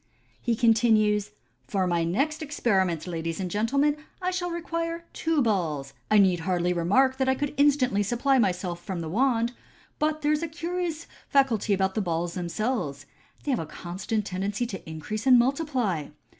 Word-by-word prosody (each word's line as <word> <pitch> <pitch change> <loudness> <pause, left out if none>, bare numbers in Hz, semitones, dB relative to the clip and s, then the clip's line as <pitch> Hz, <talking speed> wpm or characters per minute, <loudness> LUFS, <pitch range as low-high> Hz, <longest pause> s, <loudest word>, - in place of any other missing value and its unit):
He 235 -2 +1
continues, 215 -3 +3 0.2
" 125 +2 -41
For 190 -2 0
my 170 -2 +1
next 275 - 0
experiment, 190 - 0
ladies 165 -1 -3
and 185 -2 -3
gentlemen, 275 - +2 0.2
I 365 0 -1
shall 360 -1 -2
require 335 0 -3
two 320 -4 +1
balls. 160 - -1 0.2
I 215 - +5
need 190 -3 +4
hardly 180 +1 0
remark 255 +11 +3
that 265 0 +1
I 265 - +3
could 290 +1 -2
instantly 275 -7 +3
supply 245 +6 +2
myself 180 -4 -1
from 185 -4 -4
the 160 - -4
wand; 235 +3 +2 0.5
but 310 0 0
there 295 - +3
is 305 0 +1
a 335 - -1
curious 335 0 -3 0.2
faculty 255 -7 +2
about 190 -1 +2
the 215 - 0
balls 170 -2 -1
themselves 175 - -2
j 140 - -29 0.3
they 290 - -1
have 250 - +1
a 160 - -4
constant 190 +6 -3
tendency 200 +4 -2
to 190 -8 -7
increase 210 - -5
and 255 -1 +8
multiply. 250 - 0
215 Hz, 175 wpm, -26 LUFS, 180-275 Hz, 0.5 s, and